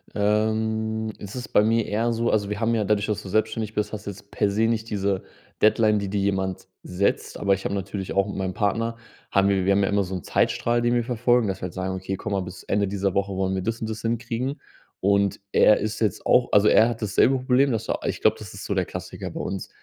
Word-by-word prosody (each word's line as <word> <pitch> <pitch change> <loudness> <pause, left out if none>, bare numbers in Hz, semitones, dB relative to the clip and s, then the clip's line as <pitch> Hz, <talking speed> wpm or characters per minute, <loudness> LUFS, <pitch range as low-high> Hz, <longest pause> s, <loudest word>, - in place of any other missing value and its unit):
Ähm, 110 +1 0
es 100 +3 -9
ist 125 -2 -5
bei 105 - +4
mir 115 0 +2
eher 115 +3 0
so 115 +1 0
also, 100 -1 +1
wir 105 +1 -3
haben 115 0 +1
ja 110 - +1
dadurch, 105 0 +1
dass 105 -1 -2
du 95 - -8
selbstständig 110 +1 0
bist, 105 +1 -2
hast 105 - -6
du - - -3
jetzt 100 +1 -15
per 105 -2 +1
se 110 +3 +1
nicht 115 0 -1
diese 100 -2 -1 0.4
Deadline, 110 0 +4
die 100 -1 -3
dir 100 - -1
jemand 95 -2 -1 0.2
setzt. 95 +3 -1
Aber 100 -1 +3
ich 95 - -3
habe 100 - -1
natürlich 95 0 -4
auch 100 +1 +2
mit - - -5
meinem 95 -1 -2
Partner 115 +3 -1 0.3
haben 100 0 +3
wir 95 -2 +2
wir 100 - +3
haben 100 0 +3
ja - - +1
immer 100 -1 +2
so 95 +1 -6
'n 90 - -5
Zeitstrahl, 120 0 +1
den 120 0 +2
wir 120 - +2
verfolgen, 120 -1 +2
dass 95 - -3
wir - - -8
halt 90 - -4
sagen: 95 0 -3
„Okay, 95 0 -4
gucke 105 - -4
mal 95 - 0
bis 90 0 -8
Ende 100 -1 0
dieser 100 -1 -1
Woche 100 0 0
wollen 95 0 0
wir 95 - -1
das 115 +3 -2
und 110 - -3
das 110 0 -5
hinkriegen.” 120 +4 -2 0.4
Und 100 0 +2
er 105 - +6
ist 110 +1 -3
jetzt 105 -4 0
auch 125 -1 +4
also 105 +1 +5
er 115 +2 +6
hat 115 -1 -5
dasselbe 115 +6 +3
Problem, 130 +2 +2
das 110 - -2 0.2
ich - - -2
glaube, - - +4
das - - -9
ist - - -8
so - - -1
der - - +1
Klassiker - - -7
bei - - -6
uns. 95 -1 -4
105 Hz, 255 wpm, -24 LUFS, 100-115 Hz, 0.4 s, er